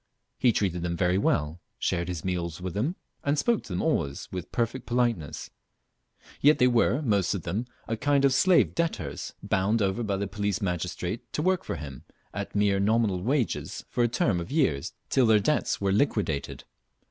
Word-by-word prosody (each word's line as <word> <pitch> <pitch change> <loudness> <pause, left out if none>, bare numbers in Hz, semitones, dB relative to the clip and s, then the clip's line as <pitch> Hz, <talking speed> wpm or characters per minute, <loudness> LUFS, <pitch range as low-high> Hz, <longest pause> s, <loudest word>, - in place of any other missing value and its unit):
He 125 - +5
treated 90 -5 0
them 85 0 -2
very 90 +1 +2
well, 80 -3 0 0.2
shared 85 -1 -1
his 90 0 -4
meals 85 -3 -2
with 90 -1 -5
them, 130 - -1 0.3
and 145 +1 +1
spoke 225 +9 +2
to - - -14
them 90 - -1
always 70 0 -1
with 90 -1 -6
perfect 120 +2 -2
politeness; 120 - -1 0.9
yet 150 +2 +6
they 125 - +4
were 125 +3 +3
most 100 -7 +1
of 90 - -4
them 105 +8 -2 0.2
a 115 - -1
kind 140 +3 +2
of 135 - +4
slave 180 +6 +4
debtors, 110 - -3
bound 100 +4 +1
over 100 +2 0
by 100 -4 -1
the 100 - -1
police 100 +1 -2
magistrate 90 +1 -3
to 150 - -1
work 185 0 +2
for - - -4
him 70 -5 -8 0.3
at 100 +1 -5
mere 100 -1 +3
nominal 105 -2 +2
wages 130 +3 -1
for 120 - +1
a - - +4
term 110 -5 +1
of 85 - -6
years 130 - +1 0.2
till 130 -3 +4
their 110 -1 +6
debts 150 +9 0
were 100 -1 +1
liquidated. 100 - 0
100 Hz, 185 wpm, -27 LUFS, 90-125 Hz, 0.9 s, yet